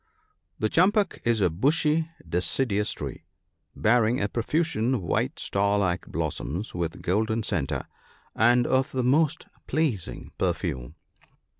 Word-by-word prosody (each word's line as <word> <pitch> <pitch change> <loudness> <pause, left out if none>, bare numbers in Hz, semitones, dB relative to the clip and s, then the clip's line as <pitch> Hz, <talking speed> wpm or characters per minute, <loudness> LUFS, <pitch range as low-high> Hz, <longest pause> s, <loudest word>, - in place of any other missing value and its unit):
— 85 +1 -48
The - - +5
champak 195 - +2
is 115 -2 +2
a 90 -3 +3
bushy 150 - +2 0.2
deciduous 105 +5 0
tree, - - -6 0.5
bearing 115 +2 +3
a 100 - +1
profusion 125 0 0
of 100 - -3
white 85 - -1
star 100 +1 +1
like 90 -3 0
blossoms 85 - -3
with 85 -2 -4
golden 110 +4 0
centre, 90 -10 -1 0.5
and 120 +2 +4
of 130 +2 +1
the 130 -1 0
most 155 +5 +2 0.2
pleasing 140 - -2
perfume. 60 -1 -2
110 Hz, 130 wpm, -26 LUFS, 95-135 Hz, 0.5 s, The